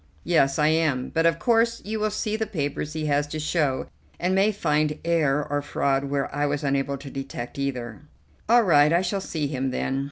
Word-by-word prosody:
"Yes, 140 Hz, -5 st, +2 dB
I 150 Hz, 0 st, +3 dB
am; 155 Hz, -5 st, +1 dB
but 165 Hz, 0 st, +2 dB
of 165 Hz, -1 st, +2 dB
course 230 Hz, +2 st, +2 dB
you 215 Hz, +1 st, -3 dB
will 215 Hz, 0 st, +1 dB
see 210 Hz, +1 st, -2 dB
the 220 Hz, 0 st, -2 dB
papers 150 Hz, -5 st, -3 dB
he 155 Hz, -1 st, -3 dB
has 145 Hz, 0 st, +1 dB
to 155 Hz, +1 st, -5 dB
show, 150 Hz, -4 st, 0 dB, 0.3 s
and 180 Hz, +2 st, 0 dB
may 195 Hz, +3 st, +3 dB
find 150 Hz, -5 st, 0 dB
error 150 Hz, -4 st, +1 dB
or 145 Hz, 0 st, -1 dB
fraud 140 Hz, -1 st, 0 dB
where 140 Hz, -1 st, -2 dB
I 145 Hz, +1 st, 0 dB
was 145 Hz, 0 st, -2 dB
unable 140 Hz, 0 st, 0 dB
to 140 Hz, 0 st, -10 dB
detect 135 Hz, -1 st, -6 dB
either." 125 Hz, -5 st, -4 dB, 0.5 s
"All 240 Hz, 0 st, +6 dB
right, 150 Hz, -5 st, +5 dB
I 170 Hz, +2 st, +3 dB
shall 195 Hz, +2 st, -1 dB
see 160 Hz, -5 st, -3 dB
him 135 Hz, -2 st, -2 dB
then." 135 Hz, +1 st, -2 dB
150 Hz, 210 wpm, -25 LUFS, 140-175 Hz, 0.5 s, All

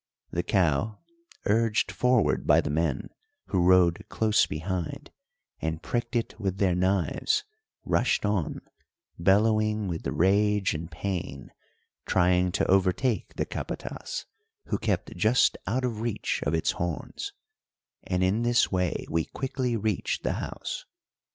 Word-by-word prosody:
The 85 Hz, -, 0 dB
cow, 90 Hz, +2 st, +1 dB, 0.5 s
urged 110 Hz, +1 st, +2 dB
forward 125 Hz, -2 st, +2 dB
by -, -, +6 dB
the -, -, -1 dB
men, 80 Hz, -2 st, -1 dB, 0.4 s
who 95 Hz, -, +2 dB
rode 90 Hz, -1 st, +4 dB
close 110 Hz, -1 st, +2 dB
behind, 85 Hz, +2 st, -4 dB, 0.5 s
and 80 Hz, 0 st, -3 dB
pricked 120 Hz, 0 st, -2 dB
it 115 Hz, -1 st, -2 dB
with 95 Hz, -3 st, -2 dB
their 95 Hz, -2 st, +2 dB
knives, 95 Hz, -, +1 dB, 0.4 s
rushed -, -, +2 dB
on, 105 Hz, -7 st, -1 dB, 0.6 s
bellowing 110 Hz, +3 st, +3 dB
with 85 Hz, -3 st, -3 dB
rage 100 Hz, +2 st, +2 dB
and 80 Hz, +2 st, -5 dB
pain, 85 Hz, -6 st, -4 dB, 0.6 s
trying 90 Hz, 0 st, +3 dB
to -, -, +1 dB
overtake 95 Hz, +6 st, +1 dB
the -, -, -1 dB
capatas, -, -, -5 dB, 0.4 s
who -, -, 0 dB
kept -, -, -1 dB
just 110 Hz, +4 st, +3 dB
out 125 Hz, +6 st, 0 dB
of 115 Hz, -3 st, -3 dB
reach 115 Hz, -2 st, -2 dB
of -, -, +1 dB
its 80 Hz, -, +1 dB
horns; 85 Hz, -2 st, -4 dB, 0.7 s
and 90 Hz, 0 st, -1 dB
in 95 Hz, +5 st, +2 dB
this 120 Hz, 0 st, +3 dB
way 90 Hz, -3 st, 0 dB
we 80 Hz, 0 st, 0 dB
quickly 130 Hz, -3 st, -2 dB
reached 110 Hz, -2 st, -1 dB
the -, -, 0 dB
house. -, -, -5 dB
95 Hz, 130 wpm, -27 LUFS, 85-110 Hz, 0.7 s, by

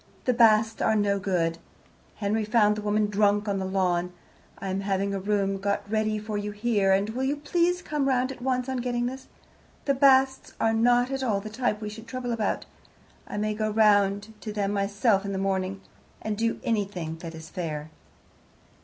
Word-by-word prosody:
The 250 Hz, -, +3 dB
Basts 225 Hz, -2 st, +4 dB
are 220 Hz, -, +3 dB
no 200 Hz, -1 st, +2 dB
good. 170 Hz, -4 st, 0 dB, 0.6 s
Henry 215 Hz, +1 st, -1 dB
found 210 Hz, -1 st, +3 dB
the 210 Hz, -, -4 dB
woman 210 Hz, 0 st, +1 dB
drunk 205 Hz, 0 st, +2 dB
on 200 Hz, -1 st, 0 dB
the 190 Hz, -, -2 dB
lawn. 180 Hz, -2 st, 0 dB, 0.5 s
I 195 Hz, -, -5 dB
am 190 Hz, +1 st, -1 dB
having 200 Hz, 0 st, -1 dB
a 195 Hz, -, -1 dB
room 195 Hz, 0 st, 0 dB
got 200 Hz, 0 st, -1 dB
ready 215 Hz, 0 st, 0 dB
for 210 Hz, 0 st, -3 dB
you 205 Hz, 0 st, -3 dB
here, 205 Hz, -2 st, +1 dB
and 195 Hz, +2 st, +3 dB
will 250 Hz, +3 st, -3 dB
you 275 Hz, +2 st, +1 dB
please 350 Hz, +4 st, 0 dB
come 295 Hz, -2 st, -1 dB
round 255 Hz, 0 st, +1 dB
at 260 Hz, -, -10 dB
once 255 Hz, 0 st, 0 dB
on 260 Hz, -1 st, -2 dB
getting 240 Hz, -1 st, -1 dB
this? 260 Hz, +2 st, -5 dB, 0.6 s
The 280 Hz, -, +3 dB
Basts 265 Hz, -1 st, +3 dB
are 225 Hz, -, +2 dB
not 245 Hz, +3 st, +3 dB
at 270 Hz, 0 st, -2 dB
all 220 Hz, -6 st, +1 dB
the 215 Hz, +2 st, -8 dB
type 220 Hz, -2 st, -1 dB
we 210 Hz, -, -4 dB
should 220 Hz, +2 st, -10 dB
trouble 250 Hz, 0 st, -4 dB
about. 220 Hz, -3 st, -1 dB, 0.6 s
I -, -, -5 dB
may 215 Hz, +1 st, 0 dB
go 215 Hz, 0 st, -1 dB
round 205 Hz, -1 st, +3 dB
to 215 Hz, -, -5 dB
them 205 Hz, -1 st, -1 dB
myself 200 Hz, +1 st, +1 dB
in 200 Hz, 0 st, -3 dB
the -, -, -2 dB
morning, 195 Hz, 0 st, -1 dB, 0.4 s
and 215 Hz, -1 st, -3 dB
do 230 Hz, +2 st, -1 dB
anything 190 Hz, -7 st, -2 dB
that 165 Hz, 0 st, -8 dB
is 160 Hz, 0 st, -10 dB
fair. 155 Hz, -4 st, -4 dB
210 Hz, 195 wpm, -26 LUFS, 195-240 Hz, 0.6 s, Basts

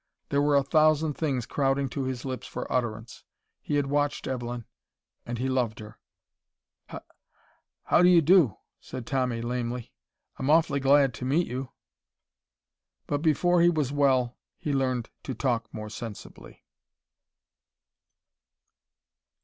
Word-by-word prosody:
There 140 Hz, -, +2 dB
were 145 Hz, 0 st, +3 dB
a 140 Hz, -, +4 dB
thousand 155 Hz, +1 st, +3 dB
things 135 Hz, -6 st, -2 dB
crowding 135 Hz, 0 st, 0 dB
to 135 Hz, +2 st, -3 dB
his 130 Hz, -1 st, -4 dB
lips 130 Hz, -1 st, -5 dB
for -, -, -5 dB
utterance. 115 Hz, -2 st, -3 dB, 0.4 s
He 150 Hz, -, -2 dB
had 145 Hz, -1 st, +2 dB
watched 145 Hz, +1 st, -1 dB
Evelyn, 120 Hz, -2 st, -4 dB, 0.6 s
and 120 Hz, 0 st, -3 dB
he 130 Hz, +3 st, -1 dB
loved 125 Hz, -4 st, 0 dB
her 105 Hz, -1 st, -11 dB, 0.9 s
"H -, -, -7 dB, 0.8 s
how -, -, +3 dB
do 180 Hz, -, +6 dB
you 175 Hz, -2 st, +7 dB
do?" 165 Hz, -, +5 dB, 0.2 s
said 125 Hz, -, -8 dB
Tommy, 125 Hz, -3 st, -1 dB
lamely. 120 Hz, 0 st, -4 dB, 0.4 s
"I'm 130 Hz, -, -2 dB
awfully 155 Hz, -3 st, +3 dB
glad 135 Hz, -1 st, +4 dB
to 125 Hz, -, -6 dB
meet 155 Hz, +7 st, +2 dB
you." 130 Hz, +1 st, -5 dB, 1.4 s
But 145 Hz, 0 st, -2 dB
before 170 Hz, +3 st, +3 dB
he 175 Hz, -, +6 dB
was 150 Hz, -6 st, 0 dB
well 130 Hz, -4 st, +1 dB, 0.2 s
he 150 Hz, -, -3 dB
learned 130 Hz, -3 st, -1 dB
to 130 Hz, -, -5 dB
talk 120 Hz, -2 st, -1 dB
more 110 Hz, -1 st, -7 dB
sensibly. 110 Hz, -2 st, -9 dB
135 Hz, 135 wpm, -27 LUFS, 120-145 Hz, 1.4 s, you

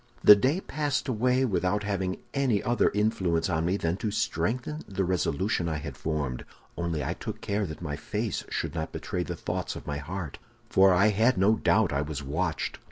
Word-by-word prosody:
"The 105 Hz, -, +11 dB
day 130 Hz, -, +1 dB
passed 145 Hz, -3 st, -2 dB
away 125 Hz, +2 st, +2 dB
without 105 Hz, -2 st, 0 dB
having 95 Hz, -2 st, -1 dB, 0.2 s
any 130 Hz, -7 st, +1 dB
other 120 Hz, -1 st, +3 dB
influence 95 Hz, -5 st, +1 dB
on 80 Hz, -1 st, 0 dB
me 90 Hz, +3 st, +1 dB
than 85 Hz, -1 st, -1 dB
to 110 Hz, -, -2 dB
strengthen 120 Hz, -, -1 dB
the 95 Hz, -1 st, -1 dB
resolution 90 Hz, +1 st, 0 dB
I 80 Hz, -, -1 dB
had 75 Hz, -, -6 dB
formed; 75 Hz, -6 st, -3 dB, 0.3 s
only 85 Hz, -3 st, -2 dB
I -, -, -1 dB
took -, -, -6 dB
care 100 Hz, -1 st, -1 dB
that 80 Hz, +2 st, -8 dB
my 75 Hz, -3 st, -3 dB
face 75 Hz, -, -3 dB
should -, -, -2 dB
not 80 Hz, -2 st, -3 dB
betray -, -, -3 dB
the -, -, -3 dB
thoughts -, -, -3 dB
of -, -, -8 dB
my 70 Hz, -1 st, -3 dB
heart, 80 Hz, +1 st, -6 dB, 0.3 s
for 95 Hz, 0 st, +6 dB
I 95 Hz, +4 st, +5 dB
had 110 Hz, +5 st, +3 dB
no 100 Hz, +4 st, +4 dB
doubt 105 Hz, -5 st, +2 dB
I 70 Hz, -, +1 dB
was 75 Hz, -1 st, -4 dB
watched. 80 Hz, +4 st, -2 dB
95 Hz, 195 wpm, -28 LUFS, 80-110 Hz, 0.3 s, The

